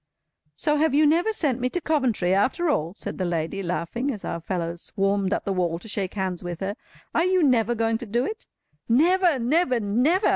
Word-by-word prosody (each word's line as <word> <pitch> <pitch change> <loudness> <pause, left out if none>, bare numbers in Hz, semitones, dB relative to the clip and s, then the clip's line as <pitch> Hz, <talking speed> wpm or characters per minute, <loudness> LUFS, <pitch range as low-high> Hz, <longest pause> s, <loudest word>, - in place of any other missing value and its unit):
"So 300 -1 +1
you - - 0
have 315 -3 +2
never 310 +7 +4
sent 285 - 0
me 250 - +1
to 355 - -2
Coventry 255 - +1
after 265 - +2
all!" 170 - -1
said - - -6
the - - 0
lady, 170 +2 -2
laughing, 180 - -2
as 220 -8 -5
our 170 - -4
fellows 170 -1 -3
swarmed 195 -1 0
up - - -1
the 195 - 0
wall 175 -3 0
to 175 - -12
shake 200 -3 -3
hands 185 -3 -2
with 175 -1 -5
her. 195 +2 -2 0.4
"Are 330 - +2
you 370 -1 +3
never 240 -4 +3
going 225 0 0
to 240 - -7
do 240 +5 0
it?" 440 - -6 0.4
"Never! 340 +5 +4
never! 255 +1 +2
never!" 250 - +2
230 Hz, 210 wpm, -24 LUFS, 190-300 Hz, 0.4 s, never